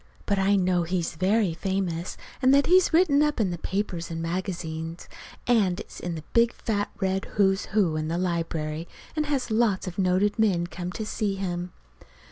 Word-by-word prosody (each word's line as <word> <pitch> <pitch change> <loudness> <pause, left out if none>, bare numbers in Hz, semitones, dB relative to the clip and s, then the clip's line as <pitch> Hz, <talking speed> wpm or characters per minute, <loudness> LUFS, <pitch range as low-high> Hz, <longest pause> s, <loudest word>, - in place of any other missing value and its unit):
But 200 -2 +1
I 195 +1 +3
know 180 -2 +2
he's 170 0 -1
very 190 +2 +2
famous, 180 -1 -2 0.2
and 260 0 +5
that 280 - +4
he's 370 +1 +5
written 320 -4 +4
up 300 -3 +1
in 200 -5 +1
the 175 - -4
papers 185 -2 -3
and 165 -1 -4
magazines, 165 -2 -4 0.4
and 205 -7 +3
is - - -11
in 175 -1 -4
the 155 - -7
big 235 0 +4
fat 205 -2 -2
red 190 -1 0
"Who's 195 -1 +3
Who" 195 -7 +1
in 155 0 -2
the 165 +2 -1
library, 165 -3 -2 0.3
and 305 -1 0
has 270 -5 -1
lots 215 -4 +2
of 185 0 -6
noted 190 +3 +2
men 190 -6 +3
come 175 +1 -5
to 220 - -4
see 210 -2 -1
him. 180 -2 -3
190 Hz, 185 wpm, -26 LUFS, 175-215 Hz, 0.4 s, and